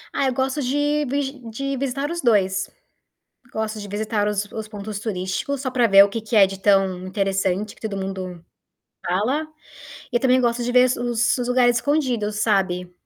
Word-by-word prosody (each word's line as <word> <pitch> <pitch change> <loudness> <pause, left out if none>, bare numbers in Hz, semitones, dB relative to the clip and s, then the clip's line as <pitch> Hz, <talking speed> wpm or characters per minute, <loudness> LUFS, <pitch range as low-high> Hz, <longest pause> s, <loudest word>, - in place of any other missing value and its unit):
Ah, 275 - +1
eu 260 - 0
gosto 265 +3 -1
de 290 +3 0
vigi 275 0 -2
de 275 +5 -3
visitar 275 +3 -2
os 340 - -3
2. 200 -6 +2 0.8
Gosto 220 0 -3
de 205 - -7
visitar 210 +1 -1
os 210 0 -1
os 220 -1 -6
pontos 210 -1 -6
turísticos, 205 +6 -3
só 260 -2 -3
pra 245 -2 +3
ver 195 -1 +8
o - - -4
que 225 +3 -4
que 220 +1 -4
é 205 -2 +8
de 195 0 -6
tão 190 -2 +2
interessante, 195 +1 -1
que - - -23
todo 210 -3 -4
mundo 185 -3 -5 0.6
fala. 220 - 0 0.7
E, 240 - +2
também, 255 0 +3
gosto 240 0 0
de 245 - -1
ver 250 0 +6
os 240 0 +1
os 245 -1 -2
lugares 245 -1 +3
escondidos, 240 -6 0
sabe. 190 -4 0
220 Hz, 185 wpm, -22 LUFS, 195-255 Hz, 0.8 s, ver